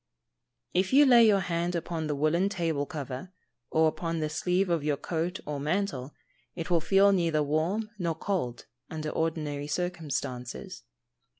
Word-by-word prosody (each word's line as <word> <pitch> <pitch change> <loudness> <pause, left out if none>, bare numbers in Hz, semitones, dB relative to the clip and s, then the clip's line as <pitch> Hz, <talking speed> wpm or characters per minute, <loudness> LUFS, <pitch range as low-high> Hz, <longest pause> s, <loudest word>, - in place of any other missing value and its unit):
If 185 +5 +1
you 290 +2 +8
lay 240 -4 +7
your 200 -2 +4
hand 175 0 -1
upon 165 -1 -3
the 150 - -1
woollen 160 +7 +2
table 165 -7 -1
cover, 150 +2 -6 0.4
or 160 0 +4
upon 165 +1 -2
the 155 -1 -1
sleeve 180 +4 +1
of 170 -4 0
your 150 -1 0
coat 170 +4 -2
or 145 -1 -3
mantle, 150 -3 -2 0.4
it 170 0 -5
will 170 -2 +4
feel 195 +4 +5
neither 165 -5 +2
warm 170 +9 -1
nor 170 -3 -1
cold, 160 -10 -3 0.2
under 155 -1 -4
ordinary 150 -3 -2
circumstances. 155 0 -4
165 Hz, 155 wpm, -28 LUFS, 150-185 Hz, 0.4 s, you